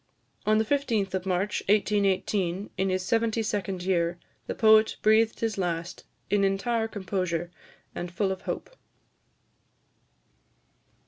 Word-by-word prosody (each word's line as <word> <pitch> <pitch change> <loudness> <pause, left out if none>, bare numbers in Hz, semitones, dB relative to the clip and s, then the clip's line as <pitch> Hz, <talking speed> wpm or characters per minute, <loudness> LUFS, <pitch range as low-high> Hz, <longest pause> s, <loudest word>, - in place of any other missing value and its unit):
On 215 0 +4
the 220 - +2
15th 225 -7 0
of 190 0 -2
March 190 +3 0
1818, 200 -2 +1
in 190 0 0
his 185 0 -1
seventy 225 +1 +1
second 195 -4 -2
year, 175 -2 +1 0.3
the - - -3
poet 220 0 +5
breathed 220 +1 +3
his 225 -3 -1
last, 170 -1 -3 0.3
in 205 -1 +3
entire 220 +4 +1
composure, 185 -5 -3 0.4
and 175 0 -5
full 190 +2 0
of 190 0 -4
hope. - - -5
195 Hz, 125 wpm, -27 LUFS, 185-220 Hz, 0.4 s, poet